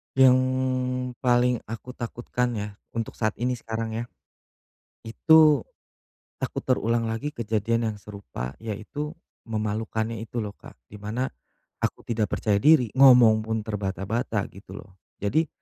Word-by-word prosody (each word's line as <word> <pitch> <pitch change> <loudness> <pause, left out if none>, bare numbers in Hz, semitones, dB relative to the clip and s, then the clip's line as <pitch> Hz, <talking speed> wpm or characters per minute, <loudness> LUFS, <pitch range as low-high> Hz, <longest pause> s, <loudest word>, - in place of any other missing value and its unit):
Yang 130 -1 +7 0.8
paling 125 -1 +3
aku 115 +3 -7
takut, 120 -1 -7
kan, 125 -1 +1
ya, 105 0 -5 0.2
untuk 115 -1 -4
saat 110 -2 0
ini, 125 +2 -1
sekarang, 115 -2 -4
ya? - - -2 1.0
Itu 150 +3 +5 0.7
takut - - -3
terulang 115 -2 +1
lagi 135 +7 -3
kejadian 115 0 0
yang 105 - -6
serupa. 95 -12 -7
Yaitu 145 - -5 0.3
memalukannya 110 +1 -2
itu, 115 +2 -7
loh, 105 -3 -3
Kak, - - -15
di 105 +7 -13
mana 110 +5 -2 0.6
aku - - -2
tidak 110 -3 -1
percaya 100 -2 +1
diri, 140 -9 +5
ngomong 125 -5 +7
pun 110 -1 -3
terbata-bata, 100 +1 -2
gitu, 95 0 -11
loh, 95 - -11 0.3
jadi 155 +11 +1
115 Hz, 135 wpm, -26 LUFS, 105-125 Hz, 1.0 s, Yang